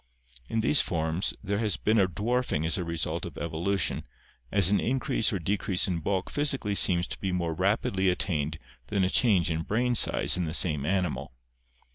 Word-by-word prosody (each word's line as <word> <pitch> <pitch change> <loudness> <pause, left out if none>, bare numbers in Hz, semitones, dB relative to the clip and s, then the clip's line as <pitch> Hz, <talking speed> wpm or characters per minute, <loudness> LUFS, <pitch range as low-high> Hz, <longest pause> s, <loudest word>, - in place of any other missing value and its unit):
In 115 - 0
these 140 +6 +4
forms 80 +2 -1
there 100 +1 -1
has 110 -4 0
been 110 +1 +2
a 95 - +4
dwarfing 105 -3 -1
as 80 - +1
a 90 - -2
result 85 -2 -3
of - - -7
evolution, 85 +3 -1 0.5
as 95 -2 +5
an 105 - +3
in 130 +3 0
crease 115 - 0
or 100 - -1
decrease 95 +1 -1
in 90 -3 -1
bulk 95 +3 -2
physically 135 -8 0
seems 90 -3 +3
to - - -7
be 95 - -2
more 85 -2 -1
rapidly 95 +1 +1
at 90 - 0
tained 80 -4 -2 0.3
than 100 -2 0
a 90 - +1
change 95 -9 +3
in 80 0 -1
brain 120 +8 0
size 115 - +3
in 90 - -1
the 80 +1 -2
same 75 -6 +1
animal. 90 -8 -1
95 Hz, 195 wpm, -27 LUFS, 85-105 Hz, 0.5 s, as